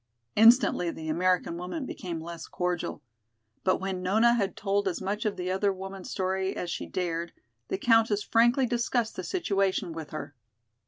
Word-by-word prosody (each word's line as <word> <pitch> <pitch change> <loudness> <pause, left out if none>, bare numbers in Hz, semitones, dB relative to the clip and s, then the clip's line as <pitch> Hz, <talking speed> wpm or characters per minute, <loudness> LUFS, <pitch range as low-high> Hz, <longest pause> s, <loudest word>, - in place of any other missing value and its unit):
Instantly 225 -5 +6
the 160 -1 -6
American 180 +1 +1
woman 185 - -4
became 175 -8 -5
less 170 0 -7
cordial. 180 -1 -3 0.6
But 185 - +3
when 190 -1 -3
Nona 220 +6 +4
had 200 -5 -1
told 200 0 0
as 180 - -1
much 205 +3 -3
of 210 - -1
the 180 0 -2
other 195 +2 +2
woman's 190 0 -7
story 190 0 -1
as 175 - -3
she - - -4
dared, 170 -2 -3 0.3
the - - -2
Countess 225 -1 +3
frankly 240 +3 +4
discussed 240 -1 0
the 185 - -4
situation 195 - 0
with 160 -2 -7
her. 155 -2 -6
190 Hz, 165 wpm, -28 LUFS, 180-220 Hz, 0.6 s, Instantly